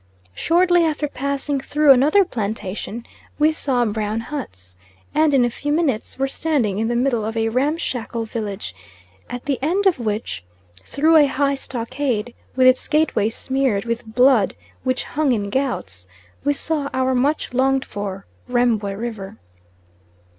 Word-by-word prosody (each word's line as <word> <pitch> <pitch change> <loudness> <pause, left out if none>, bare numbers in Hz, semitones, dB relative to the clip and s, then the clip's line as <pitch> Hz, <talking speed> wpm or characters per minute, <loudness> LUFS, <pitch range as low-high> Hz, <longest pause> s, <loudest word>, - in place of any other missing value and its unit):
Shortly 350 - +3
after 305 -2 0
passing 280 +1 -2
through 295 +1 +4
another 295 +10 +5
plantation, 215 - -4 0.3
we 305 +1 +4
saw 260 -6 +1
brown 215 0 -2
huts, 95 - -7 0.4
and 310 0 +3
in 265 -3 +4
a - - +1
few 290 +5 -3
minutes 295 -8 0
were 270 +1 +1
standing 270 -10 0
in 225 - 0
the 240 - -1
middle 240 -2 +1
of 225 +1 -3
a 225 0 +1
ramshackle 250 -3 -1
village, 205 - -5 0.6
at 245 +1 -6
the 275 -3 -1
end 360 +8 +1
of 370 -8 +3
which, 215 - -3 0.3
through 305 - +2
a 295 -2 +6
high 280 +1 +1
stockade, 250 -3 -3 0.2
with 260 0 +4
its 255 0 +4
gateway 300 -9 +2
smeared 260 -3 -1
with 230 +1 -2
blood 250 -5 +4 0.3
which 255 0 0
hung 295 -3 0
in 200 -3 -2
gouts, 100 - -2 0.4
we 290 +1 +2
saw 290 -1 -2
our 260 0 +1
much 275 +2 0
longed 265 +1 +2
for 195 -1 -6 0.2
Rembwe 235 -5 +1
River. 220 -3 -6
255 Hz, 150 wpm, -21 LUFS, 220-285 Hz, 0.6 s, a